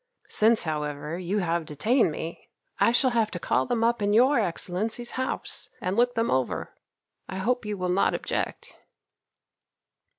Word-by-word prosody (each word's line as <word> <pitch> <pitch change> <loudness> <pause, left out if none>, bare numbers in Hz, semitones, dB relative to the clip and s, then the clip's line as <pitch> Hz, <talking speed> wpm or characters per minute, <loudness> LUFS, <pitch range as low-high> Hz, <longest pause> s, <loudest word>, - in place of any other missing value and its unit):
Since, 225 +1 +3
however, 150 0 -3
you 185 +3 -1
have 170 -1 0
detained 210 - +2
me, 165 +2 -7 0.3
I - - +5
shall 255 +2 +3
have 225 -2 +2
to 175 - -5
call 130 -5 +1
them 230 -2 0
up 235 -1 +2
in 205 0 +2
your 250 +4 +5
Excellency's 210 +5 -2
house 260 0 -4
and 185 +1 -2
look 245 +2 +2
them 230 0 +1
over. 130 -1 -1 0.6
I - - -5
hope 245 +5 0
you 210 -1 -2
will 180 -1 -2
not 180 +2 +2
object." - - -3
205 Hz, 160 wpm, -26 LUFS, 170-235 Hz, 0.6 s, I